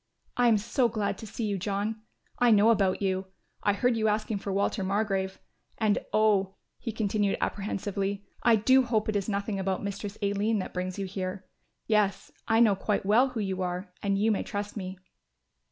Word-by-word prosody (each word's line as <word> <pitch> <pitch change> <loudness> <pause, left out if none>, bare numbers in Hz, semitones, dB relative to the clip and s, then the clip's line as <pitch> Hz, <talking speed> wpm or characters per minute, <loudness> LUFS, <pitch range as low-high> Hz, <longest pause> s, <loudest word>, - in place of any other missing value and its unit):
"I 245 0 +4
am 225 -2 +5
so 235 +4 +1
glad 210 -2 -2
to 220 - -8
see 225 +2 -4
you, 200 -2 -1
John; 205 +3 -2 0.4
I 245 - +5
know 215 +1 +6
about 200 -3 +1
you. 190 0 0 0.3
I 205 - +2
heard 245 +4 +2
you 220 -1 +1
asking 215 0 0
for 195 - -4
Walter 200 +1 0
Margrove, 195 -1 -1 0.4
and 215 -2 +2
oh," 205 -3 +2 0.2
he 230 - -4
continued, 205 -2 0
apprehensively, 200 0 -2 0.2
"I 235 -2 +5
do 260 +5 +5
hope 225 -4 0
it 215 - -1
is 200 0 -1
nothing 200 0 -2
about 190 0 -1
Mistress 200 +1 -5
Aline 205 +2 +1
that 185 - -4
brings 185 +1 -3
you 200 - -2
here. 185 0 -5 0.4
Yes, 210 -3 +1 0.2
I 225 0 +3
know 220 -4 +5
quite 195 +1 -1
well 225 +6 +5
who 250 -3 -5
you 190 -2 -2
are 180 +1 -3
and 200 -1 +1
you 215 +3 +3
may 210 - +1
trust 205 0 -4
me." 185 -2 -5
205 Hz, 190 wpm, -28 LUFS, 195-220 Hz, 0.4 s, know